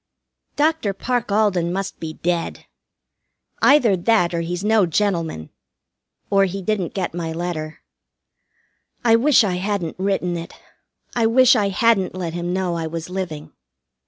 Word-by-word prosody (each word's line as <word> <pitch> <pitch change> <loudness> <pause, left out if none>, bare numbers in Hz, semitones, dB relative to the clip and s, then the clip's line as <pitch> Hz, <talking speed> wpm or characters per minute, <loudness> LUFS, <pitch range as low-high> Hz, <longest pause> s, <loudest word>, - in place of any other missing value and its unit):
Dr. 295 -9 +1
Parke 245 0 -2
Alden 200 -5 +2
must 195 +1 -4
be 160 -1 -5
dead. 170 +1 -3 1.0
Either 260 -8 +5
that 180 -1 +2
or 170 - -1
he's 175 +2 -4
no 210 -3 +3
gentleman, 165 - -1 0.8
or 195 -1 +4
he 195 +1 -5
didn't 200 -4 -2
get 190 -4 -2
my 165 -2 -4
letter. 160 -2 -5 1.2
I 230 -1 +6
wish 255 +2 +5
I 185 -4 -1
hadn't 185 -3 -3
written 185 -2 -1
it. 165 - -8 0.6
I 230 -2 +3
wish 255 +2 +5
I 205 -4 +1
hadn't 195 -2 +2
let 175 -3 -4
him 175 0 -3
know 185 -1 -1
I 165 -1 -3
was 165 +2 -6
living. 175 -6 -5
185 Hz, 145 wpm, -21 LUFS, 170-215 Hz, 1.2 s, I